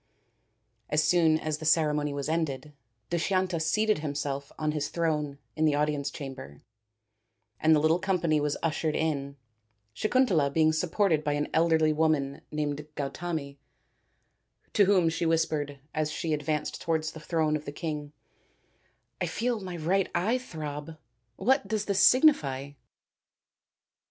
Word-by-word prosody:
As 150 +1 +2
soon 160 -2 +4
as 155 -1 -3
the 155 - -7
ceremony 150 -2 +2
was 140 0 -3
ended 150 -3 -2 0.4
Dushyanta 185 0 0
seated 215 +5 +2
himself 140 -2 -3
on 155 -1 0
his 150 -1 -2
throne 150 -4 -1 0.2
in 155 - +1
the 150 -2 +3
audience 145 -1 0
chamber, 130 - -9 1.0
and 160 0 +5
the - - +3
little 160 +3 +3
company 175 -5 +1
was 145 0 -1
ushered 155 -1 0
in, 140 -3 -2 0.6
Sakuntala 210 - +2
being 160 +1 +3
supported 165 0 +1
by 145 -1 0
an 145 0 -1
elderly 160 -1 +3
woman 150 -3 0
named 150 -1 -3
Gau 140 -1 -2
tami, 155 -5 -5 1.2
to 205 - +5
whom 185 -3 +4
she 165 +1 0
whispered, 155 -3 0 0.2
as 155 -1 0
she 160 0 -2
advanced 150 0 -2
towards 160 -1 -1
the 160 - -10
throne 155 -1 0
of 155 0 -4
the - - -5
king, 150 -2 -5 0.5
" - - -41
I - - +1
feel 240 -1 -1
my 185 -3 -6
right 180 +4 +1
eye 215 +9 +1
throb 155 - -7 0.4
what 255 - +2
does 210 0 -1
this 200 -1 0
signify?" 150 - +4
155 Hz, 145 wpm, -28 LUFS, 150-170 Hz, 1.2 s, and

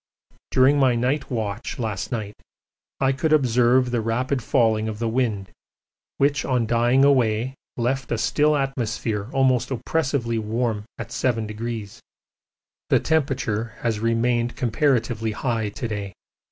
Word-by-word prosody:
During 135 +3 +4
my 130 -3 +4
night 130 +5 0
watch 110 -3 -3
last 110 -4 -3
night 110 -4 -3 0.7
I 135 -1 +3
could 155 +4 -1
observe 125 -3 +3
the 120 -2 0
rapid 125 +4 -1
falling 110 -1 +2
of 105 - -5
the 115 +1 -2
wind, 110 -5 -1 0.7
which 140 0 +2
on 125 -3 +1
dying 120 +4 +3
away 125 -2 +2 0.2
left 130 +1 -1
a 120 - +1
still 150 +6 +2
atmosphere 115 -5 -2
almost 130 -2 +2
oppressively 130 -2 -1
warm 110 -1 -2
at 115 -1 -6
7°. 115 -3 -3 0.9
The - - +4
temperature 130 -8 -1
has 115 -3 -1
remained 115 +1 +1
comparatively 120 -3 0
high 110 -1 -1
to 120 +4 -5
day. 100 -3 -5
120 Hz, 130 wpm, -23 LUFS, 110-130 Hz, 0.9 s, During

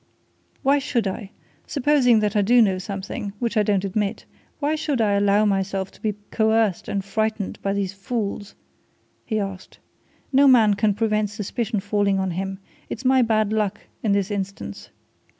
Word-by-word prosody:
"Why 280 +2 +4
should 250 -5 -1
I 195 +1 -4 0.4
supposing 265 -5 +3
that 210 0 0
I 210 - +4
do 240 +5 +4
know 195 -5 +3
something, 195 +1 -5
which 235 -1 -2
I 215 - +4
don't 200 -2 +1
admit 200 +2 -2 0.3
why 295 +1 0
should 300 -4 -1
I 215 -2 +3
allow 200 +1 +3
myself 195 -1 -1
to - - -20
be 215 -2 -1 0.2
coerced 220 -3 +1
and 195 -1 -2
frightened 215 0 -2
by 195 - -1
these 200 -1 -2
fools?" 205 0 -4 0.7
he 215 - 0
asked. 195 -2 -6 0.6
"No 275 +2 +6
man 225 -5 +6
can 205 0 +1
prevent 215 -1 +1
suspicion 215 +2 -3
falling 205 -1 +1
on 190 -1 -1
him 190 +2 -3 0.3
it's 255 - -6
my 260 0 +5
bad 215 -2 +2
luck 210 -3 0 0.2
in 215 - +1
this 200 0 +1
instance. 195 - -5
210 Hz, 170 wpm, -23 LUFS, 195-225 Hz, 0.7 s, No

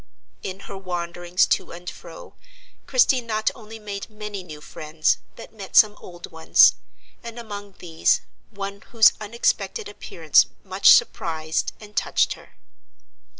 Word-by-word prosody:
In 190 +1 -6
her 200 - -9
wanderings 175 -1 -1
to - - -1
and 175 +1 -11
fro, 170 -1 -10 0.5
Christie 390 - +3
not 220 -2 -1
only 225 -1 -11
made 205 -1 -7
many 210 -2 -7
new 155 -4 -10
friends, 155 +1 -1 0.2
but - - -12
met 200 -4 -10
some 210 -1 +6
old 175 0 -11
ones; 160 0 +5 0.5
and 235 0 -8
among 205 -3 -8
these 165 -2 +1 0.3
one 200 -1 -7
whose 225 -3 +6
unexpected 235 - -1
appearance 415 - +2 0.2
much - - +3
surprised 160 - +1
and 210 -1 -14
touched - - +1
her. - - -17
200 Hz, 135 wpm, -23 LUFS, 175-220 Hz, 0.5 s, some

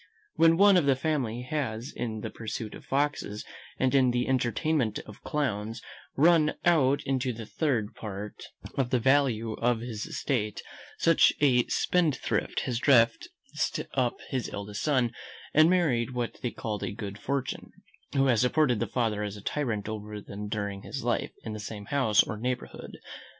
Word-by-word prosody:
When 165 0 +5
one 200 0 +7
of 160 -5 +2
the 135 - +5
family 130 -5 -1
has 125 -3 -3
in 110 -2 -3
the - - -5
pursuit 110 -1 -5
of - - -10
foxes, 135 -7 -1 0.3
and 130 0 +1
in 130 -2 +5
the 120 0 0
entertainment 125 -1 +1
of 105 - -12
clowns, 115 -6 -2 0.4
run 155 0 +4
out 145 -5 +4
the 125 -4 -1
third 120 -6 -1
part 105 -1 -7 0.3
of 135 -3 0
the 125 - +2
value 125 -3 +2
of 115 0 0
his 115 -3 -5
estate, 110 -7 -2 0.3
such 165 -1 +5
a 125 -4 +4
spendthrift 170 -6 0
has 120 -2 -2
dressed 115 -4 +4 0.7
up 125 -3 +1
his 130 -3 -2
eldest 100 0 -5
son, 130 -6 +2 0.4
and 155 +2 +6
married 130 -9 +1
what 120 -1 -3
they 125 - -1
call 105 -3 -4
a - - -2
good 100 -1 -6
fortune: 135 +3 -3 0.4
who 135 0 +4
has 120 -5 +3
supported 125 -2 +3
the - - -1
father 110 -4 0
as 105 0 -4
a - - -10
tyrant 115 -9 -2
over 105 -1 -5
them 105 +1 -7
during 100 -2 -3
his - - -6
life, - - -1
in 110 - -5
the 105 - -5
same 105 0 -7
house 120 -4 +3
or 110 - -5
neighbourhood. 125 +3 -4
120 Hz, 165 wpm, -28 LUFS, 110-140 Hz, 0.7 s, one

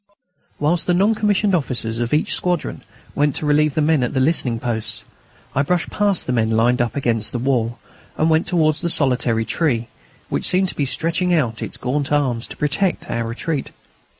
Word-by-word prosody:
Whilst 160 +4 0
the 180 - +3
non 200 +5 +3
commissioned 210 -2 +1
officers 120 -8 0
of 120 0 -1
each 150 - +1
squadron 180 -3 -2 0.3
went 145 -1 +1
to - - -3
relieve 150 0 +2
the 155 - +2
men 155 -2 +3
at 125 +2 -2
the - - +2
listening 130 -5 +1
posts, 115 -2 -3 0.5
I 140 - +2
brushed 175 +5 0
past 205 -3 +1
the 125 - -1
men 110 -2 +1
lined 120 +3 +2
up 120 -2 -1
against 115 -6 -1
the - - -1
wall, 120 -2 0 0.4
and 155 - +2
went 160 +1 +2
towards 155 -4 +2
the 170 - -1
"solitary 125 -7 +1
tree," 120 -8 0 0.4
which - - -1
seemed 185 +1 +3
to - - -5
be 145 - 0
stretching 170 +5 0
out 120 -8 0
its - - -5
gaunt 140 +3 -2
arms 130 -5 0
to - - -10
protect 150 +6 0
our 115 -1 -1
retreat. 135 +5 -3
145 Hz, 195 wpm, -20 LUFS, 120-165 Hz, 0.5 s, the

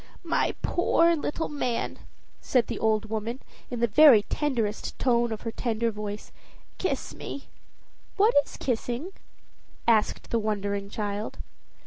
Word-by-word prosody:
"My 335 - +1
poor 340 -1 +3
little 315 +1 -2
man!" 250 -5 -2 0.4
said 250 -3 +2
the - - -5
old 220 -1 +2
woman 225 +3 -3 0.3
in 245 -2 -4
the - - +5
very 235 -2 +7
tenderest 230 -6 -2
tone 240 -2 +2
of 220 - -4
her 230 - -4
tender 230 0 -1
voice. 210 0 -6 0.5
"Kiss - - -2
me!" 280 - -8 0.7
"What 425 +4 +5
is - - -12
kissing?" 245 +6 -2 0.8
asked 220 -2 +2
the 230 - +2
wondering 200 -2 -2
child. 205 0 -4
230 Hz, 130 wpm, -27 LUFS, 215-270 Hz, 0.8 s, very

